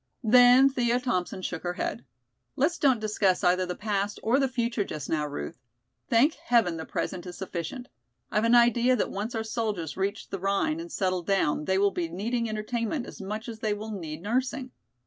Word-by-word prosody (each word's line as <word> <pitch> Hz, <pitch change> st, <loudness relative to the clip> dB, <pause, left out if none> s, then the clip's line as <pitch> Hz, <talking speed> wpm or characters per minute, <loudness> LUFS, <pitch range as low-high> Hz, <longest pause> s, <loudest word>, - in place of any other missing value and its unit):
Then 245 Hz, +3 st, +7 dB
Thea 245 Hz, -2 st, +1 dB
Thompson 185 Hz, -6 st, -2 dB
shook 180 Hz, -2 st, -3 dB
her 175 Hz, 0 st, -2 dB
head. 120 Hz, -5 st, -3 dB, 0.5 s
"Let's 315 Hz, +6 st, +1 dB
don't 265 Hz, -5 st, +4 dB
discuss 210 Hz, -3 st, +1 dB
either 180 Hz, 0 st, +3 dB
the 180 Hz, -, -3 dB
past 205 Hz, 0 st, -2 dB
or 240 Hz, +5 st, +3 dB
the 270 Hz, -, +2 dB
future 235 Hz, -3 st, -1 dB
just 155 Hz, -7 st, -6 dB
now, 150 Hz, -2 st, 0 dB
Ruth. 110 Hz, -, -6 dB, 0.5 s
Thank 260 Hz, +7 st, +4 dB
heaven 225 Hz, -9 st, +1 dB
the 160 Hz, -, -5 dB
present 180 Hz, -1 st, -4 dB
is 175 Hz, -, -8 dB
sufficient! 190 Hz, +7 st, -5 dB, 0.4 s
I've 210 Hz, -, +1 dB
an 230 Hz, +1 st, +5 dB
idea 240 Hz, +1 st, +5 dB
that 235 Hz, -, -1 dB
once 210 Hz, +4 st, -4 dB
our 220 Hz, -, -1 dB
soldiers 215 Hz, -8 st, -3 dB
reach 200 Hz, +3 st, -2 dB
the 195 Hz, -, -4 dB
Rhine 200 Hz, -, 0 dB
and 340 Hz, 0 st, -7 dB
settle 185 Hz, -2 st, 0 dB
down 170 Hz, -5 st, +1 dB
they 190 Hz, +3 st, +1 dB
will 200 Hz, +1 st, +3 dB
be 170 Hz, -3 st, -2 dB
needing 230 Hz, +6 st, -2 dB
entertainment 230 Hz, +4 st, -2 dB
as -, -, -10 dB
much 215 Hz, +4 st, -5 dB
as 225 Hz, -2 st, -7 dB
they 215 Hz, -2 st, 0 dB
will 215 Hz, +1 st, -6 dB
need 165 Hz, -5 st, -6 dB
nursing. 255 Hz, +4 st, -1 dB
215 Hz, 195 wpm, -27 LUFS, 185-240 Hz, 0.5 s, Then